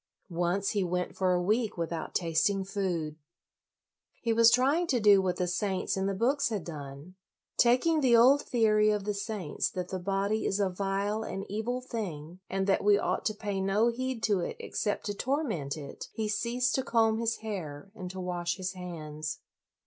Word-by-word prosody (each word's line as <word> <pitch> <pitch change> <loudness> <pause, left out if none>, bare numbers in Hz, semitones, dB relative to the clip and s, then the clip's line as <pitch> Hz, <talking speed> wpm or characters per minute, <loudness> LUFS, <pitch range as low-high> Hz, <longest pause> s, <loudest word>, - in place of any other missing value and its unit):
Once 175 +3 0
he 205 -3 +1
went 180 0 -2
for 185 -1 +1
a 180 - +3
week 215 +3 +1
with 170 0 -2
out 165 - -5
tasting 190 +4 +1
food. 180 -6 -2 1.0
He 230 -1 0
was 230 0 +7
trying 280 +8 +3
to 255 -6 +2
do 205 -2 +6
what 185 -1 0
the 180 - 0
saints 185 +1 -1
in 190 0 0
the 195 - -1
books 255 +6 +1
had 210 -6 -3
done. 145 +1 -8 0.4
Taking 255 +7 +4
the 245 -4 +5
old 265 +5 +6
theory 215 -3 +3
of 210 -1 0
the 210 +1 -1
saints 200 -6 -2
that 180 -1 -5
the 190 - -3
body 200 +3 0
is 195 - 0
a 195 -2 +1
vile 200 +3 -1
and 195 -2 -5
evil 225 +5 -2
thing, 180 - -6
and 190 0 -1
that 195 - +2
we 205 0 +5
ought - - -1
to 215 - 0
pay 205 -2 -3
no 200 +4 +3
heed 255 -1 -3
to 205 -4 +2
it 175 - -3
except 205 - -2
to 205 - -2
torment 220 - -2
it, 140 -2 -8
he 220 -1 -2
ceased 235 +4 0
to 265 - +1
comb 225 -2 +2
his 230 0 0
hair 180 -4 -5
and 185 -4 -7
to 185 +1 -7
wash 175 -2 -2
his 185 -1 -3
hands. 155 -4 -6
200 Hz, 195 wpm, -29 LUFS, 180-225 Hz, 1.0 s, was